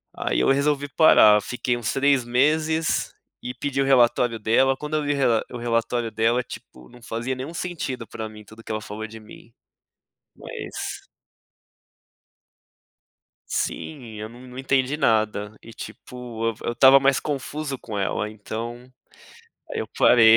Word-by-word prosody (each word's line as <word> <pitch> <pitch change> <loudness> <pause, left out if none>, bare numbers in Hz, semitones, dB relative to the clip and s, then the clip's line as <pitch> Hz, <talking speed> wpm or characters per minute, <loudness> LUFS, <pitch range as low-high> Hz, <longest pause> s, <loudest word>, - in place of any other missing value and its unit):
aí - - -1
eu - - +3
resolvi 145 +1 +1
parar, 110 -9 +6
fiquei 125 +4 -2
uns 115 -3 -2
3 140 -1 +3
meses 155 +6 +1 0.3
e 125 - -5
pedi 135 +2 -2
o - - +2
relatório 120 -3 +3
dela, 130 +5 +3
quando 150 +2 -4
eu 155 - 0
vi 145 0 +1
o - - -2
rela 120 -5 +3
o 125 - -5
relatório 115 0 -1
dela, 115 +3 +2
tipo, 65 - -12
não 120 - -16
fazia 115 +3 -3
nenhum 130 +6 -6
sentido 150 -10 -4
para 110 - -6
mim 105 0 -12
tudo 110 +2 -15
que - - -7
ela 110 0 -2
falou 105 +1 -6
de 110 +1 -11
mim, 110 +2 -15 0.8
mas - - -7 2.4
Sim 125 -8 -4
eu 110 +1 -5
não 120 +2 -14
não 125 0 -11
entendi 135 +1 +1
nada. 110 -4 +1
E, 115 - -12
tipo 120 0 -7
eu 115 - -2
v - - -10
eu - - 0
estava 135 +3 +7
mais 135 0 +3
confuso 145 0 -4
com 110 -3 -7
ela 100 +1 -1
então, 115 +4 -7 0.8
aí - - -3
eu - - -5
parei, 115 -2 +7
120 Hz, 160 wpm, -24 LUFS, 110-135 Hz, 2.4 s, estava